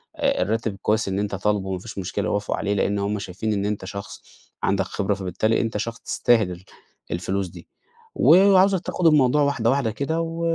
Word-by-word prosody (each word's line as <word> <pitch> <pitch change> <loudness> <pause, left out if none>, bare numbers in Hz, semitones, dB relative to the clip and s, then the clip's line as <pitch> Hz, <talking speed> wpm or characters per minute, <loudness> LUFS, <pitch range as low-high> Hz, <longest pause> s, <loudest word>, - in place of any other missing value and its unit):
آآ 275 -3 0
الراتب 110 -2 -1
كويس 110 0 +1
إن 95 +1 -1
أنت 100 -1 -2
طالبه، 100 0 0
وما 95 -1 -3
فيش 105 +2 -10
مشكلة 95 -1 -3
يوافقوا 105 0 -1
عليه، 100 0 -1
لإن 100 0 0
هُم 100 +1 -1
شايفين 100 +3 -3
إن 100 -1 -1
أنت 105 -2 -3
شخص 100 0 -8 0.4
عندك - - +1
خبرة، 100 0 -1
فبالتالي 100 +3 0
أنت 115 -2 -2
شخص 115 +2 -4
تستاهل 115 -6 +1
ال 90 +1 -9 0.5
الفلوس 95 +3 -2
دي. 85 0 -13 0.5
وعاوزك 190 +2 +5
تاخد 180 -3 0
الموضوع 150 -2 +4
واحدة، 130 -5 +1
واحدة 135 -4 +1
كده، 160 +8 -2
و 165 0 -4
105 Hz, 190 wpm, -23 LUFS, 100-140 Hz, 0.5 s, وعاوزك